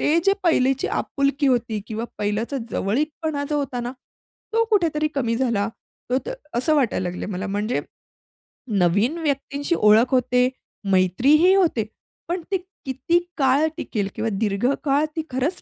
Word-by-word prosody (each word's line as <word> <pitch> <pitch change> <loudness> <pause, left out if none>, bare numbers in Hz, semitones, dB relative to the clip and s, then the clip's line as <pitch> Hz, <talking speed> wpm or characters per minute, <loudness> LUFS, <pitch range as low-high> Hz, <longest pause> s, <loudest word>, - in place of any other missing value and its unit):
ते 315 +3 +3
जे 395 - +5
पहिलीची 270 -6 +2
आपुलकी 280 0 0
होती 230 -4 0
किंवा 225 +1 -4
पहिल्याचा 210 +6 -1
जवळीकपणा 295 +6 -1
जो 295 - +1
होता 265 -3 -2
ना 240 +1 -4 0.6
तो 455 +1 +3
कुठेतरी 320 -7 +2
कमी 235 -4 0
झाला, 230 -4 +1 0.4
तो 255 - +3
तर - - -3 0.2
असं 255 +6 +2
वाटायला 240 -10 +1
लागले 180 +1 -5
मला. 195 0 -4
म्हणजे 205 +4 -1 1.0
नवीन 205 - +2
व्यक्तींशी 285 +1 -1
ओळख 215 +2 +5
होते, 250 0 +3 0.4
मैत्रीही 260 - +4
होते 330 - +2 0.4
पण 350 +1 -2
ती 385 - +3 0.3
किती 275 +6 +1 0.2
काळ 275 +3 +3
टिकेल 205 -4 -2
किंवा 225 - -1
दीर्घकाळ 260 +8 +1
ती 320 - 0
खरंच 265 +8 -1
260 Hz, 140 wpm, -23 LUFS, 225-300 Hz, 1.0 s, जे